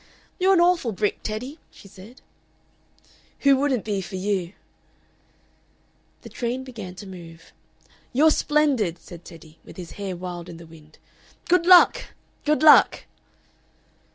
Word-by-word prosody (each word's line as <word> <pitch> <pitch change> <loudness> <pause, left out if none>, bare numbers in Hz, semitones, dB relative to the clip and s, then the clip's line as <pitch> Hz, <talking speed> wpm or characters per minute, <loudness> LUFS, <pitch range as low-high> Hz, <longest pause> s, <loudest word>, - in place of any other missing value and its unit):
"You're 380 +1 +4
an - - +3
awful 345 -10 +1
brick, 205 +2 -2
Teddy!" 250 +8 -6
she - - -17
said. 205 +6 -15 1.2
"Who 280 -1 +5
wouldn't 270 -4 -1
be 205 -3 -2
for 190 - -8
you?" 190 -2 -3 1.7
The - - -10
train 245 +2 -4
began 215 -8 -9
to 200 - -10
move. 170 -3 -13 0.6
"You're 305 +5 +4
splendid!" 285 - 0
said 170 +1 -13
Teddy, 160 -2 -15
with - - -15
his 175 -2 -9
hair 190 -2 -4
wild 175 -1 -8
in 170 - -10
the 170 - -13
wind. 155 -1 -18 0.5
"Good 350 0 +2
luck! 365 -1 +7 0.4
Good 305 +1 +1
luck!" 310 - +6
210 Hz, 135 wpm, -23 LUFS, 175-280 Hz, 1.7 s, luck